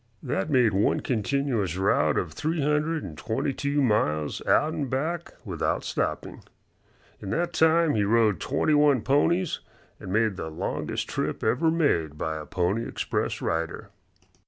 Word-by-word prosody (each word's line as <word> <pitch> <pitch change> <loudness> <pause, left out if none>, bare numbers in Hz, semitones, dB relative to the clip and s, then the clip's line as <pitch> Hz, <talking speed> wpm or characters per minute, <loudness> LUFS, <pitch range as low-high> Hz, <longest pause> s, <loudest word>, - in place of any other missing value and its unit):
That 145 +4 -2
made 125 -7 +3
one 100 +2 +2
continuous 115 - -1
route 80 -6 +2
of 80 -4 -2
three 160 - -2
hundred 150 +2 0
and 80 -5 -7
twenty 110 - -2
two 140 +1 0
miles 75 - 0
out 155 +2 +3
and 145 -5 -3
back 160 +7 -3
without - - -1
stopping. - - -3 0.8
In 100 - -6
that 175 - -1
time 160 0 +4
he 105 - +2
rode 105 -3 +3
twenty 140 - 0
one 145 -4 +4
ponies 165 +6 +2 0.4
and 95 - -7
made 110 -1 +1
the 80 - -4
longest 80 - -3
trip - - -3
ever 160 +6 +2
made 85 - +1
by 80 0 -2
a 75 - -8
Pony 95 +6 -1
Express - - -2
rider. 80 0 -3
125 Hz, 155 wpm, -26 LUFS, 95-150 Hz, 0.8 s, time